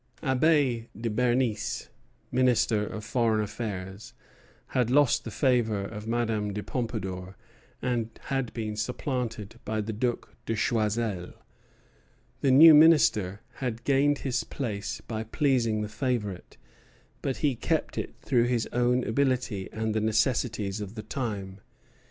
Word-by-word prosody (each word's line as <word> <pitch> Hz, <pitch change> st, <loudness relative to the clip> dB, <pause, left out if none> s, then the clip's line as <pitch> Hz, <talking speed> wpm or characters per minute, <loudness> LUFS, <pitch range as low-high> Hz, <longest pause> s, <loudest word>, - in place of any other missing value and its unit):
Abbé 130 Hz, -4 st, +2 dB
de 115 Hz, -1 st, -2 dB
Bernis, 120 Hz, 0 st, 0 dB, 0.4 s
Minister 120 Hz, -4 st, +2 dB
of 105 Hz, -1 st, -6 dB
Foreign 115 Hz, -1 st, +1 dB
Affairs, 105 Hz, -2 st, -5 dB, 0.5 s
had 125 Hz, -2 st, +1 dB
lost 140 Hz, 0 st, +4 dB
the -, -, -6 dB
favor 115 Hz, -4 st, +1 dB
of 105 Hz, +2 st, -7 dB
Madame 110 Hz, -3 st, -1 dB
de 105 Hz, +1 st, -4 dB
Pompadour, 95 Hz, -6 st, -4 dB, 0.5 s
and 120 Hz, -3 st, 0 dB
had 135 Hz, -4 st, -2 dB
been 110 Hz, -2 st, -3 dB
supplanted 115 Hz, -1 st, -3 dB
by 110 Hz, -1 st, -2 dB
the 110 Hz, +1 st, -3 dB
Duc 120 Hz, +3 st, -2 dB
de 115 Hz, -, 0 dB
Choiseul. 105 Hz, -4 st, -1 dB, 1.1 s
The 135 Hz, -, +2 dB
new 155 Hz, +5 st, +9 dB
Minister 115 Hz, -, +5 dB, 0.2 s
had 120 Hz, -3 st, -3 dB
gained 140 Hz, +1 st, +3 dB
his 125 Hz, -2 st, 0 dB
place 105 Hz, -7 st, -4 dB
by 110 Hz, -1 st, -3 dB
pleasing 115 Hz, -3 st, +1 dB
the -, -, -3 dB
favorite; 105 Hz, -4 st, -3 dB, 0.6 s
but 135 Hz, -, -2 dB
he 140 Hz, -, +3 dB
kept 160 Hz, +6 st, -1 dB
it -, -, -4 dB
through 120 Hz, -4 st, +3 dB
his 120 Hz, -2 st, 0 dB
own 125 Hz, +1 st, +2 dB
ability 125 Hz, -5 st, 0 dB
and 110 Hz, 0 st, -2 dB
the 110 Hz, -, 0 dB
necessities 110 Hz, -2 st, 0 dB
of 105 Hz, +1 st, -7 dB
the 110 Hz, -, -6 dB
time. 105 Hz, -6 st, -4 dB
115 Hz, 135 wpm, -28 LUFS, 105-125 Hz, 1.1 s, new